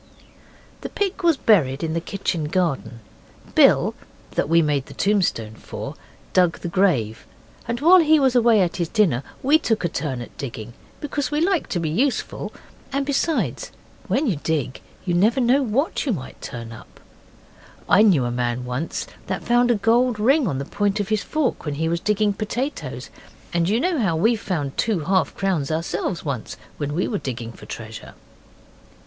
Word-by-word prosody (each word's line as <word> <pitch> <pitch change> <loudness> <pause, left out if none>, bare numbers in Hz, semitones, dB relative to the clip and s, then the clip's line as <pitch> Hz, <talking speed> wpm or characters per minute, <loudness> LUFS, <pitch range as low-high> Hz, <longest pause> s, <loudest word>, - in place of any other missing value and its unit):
The - - -5
pig 395 -1 -2
was 335 -4 +3
buried 160 - +3
in 160 -1 -1
the 165 - -1
kitchen 175 -3 -2
garden. 140 - -1 0.5
Bill, - - +5 0.4
that - - -1
we 165 +1 +5
made 145 -3 0
the - - -12
tombstone 180 - 0
for, - - -7 0.4
dug 180 -3 +3
the - - -3
grave, 170 - +1 0.4
and 235 0 -2
while 360 +4 +7
he 315 -2 +5
was 265 -3 +2
away 230 -3 +5
at 170 -1 -2
his 170 -3 -1
dinner 190 - +2 0.2
we 295 +4 +5
took 225 - 0
a - - +3
turn 145 -5 -3
at 120 - -9
digging, 120 -4 -6 0.3
because 285 -2 -2
we 295 0 0
like 355 +1 +1
to 175 - -2
be 165 - -1
useful, 255 - -1 0.4
and 275 +1 -1
besides, 290 +3 -1 0.4
when 250 +10 +1
you 200 - 0
dig 145 -4 -2 0.2
you 175 - 0
never 215 +9 +3
know 255 +3 +3
what 265 +5 0
you 265 - 0
may 130 -8 -6
turn 115 -3 -7
up. 115 - -13 0.9
I 205 - +6
knew 180 - +4
a 120 - -1
man 120 0 -2
once 125 +6 -3 0.2
that - - -3
found 240 0 +3
a 240 - +4
gold 230 +2 +2
ring 265 +4 +3
on 140 -7 -1
the 140 - -3
point 205 +4 -1
of 205 -1 -2
his 215 -2 +1
fork 310 -5 -1
when 150 -2 -3
he 160 +3 -1
was 170 +1 0
digging 210 +1 +1
potatoes, 240 +7 -4 0.4
and 170 0 +1
you 220 +3 +2
know 345 +1 0
how 190 -8 +1
we 225 +9 +3
found 155 -10 -3
two 215 -7 +1
half 185 +4 +1
crowns 180 -8 -1
ourselves 165 +2 -2
once 125 -6 -4 0.2
when 145 -1 -3
we 180 - 0
were 210 - -2
digging 120 -3 -5
for - - -14
treasure. 110 -1 -8
190 Hz, 185 wpm, -22 LUFS, 145-240 Hz, 0.9 s, while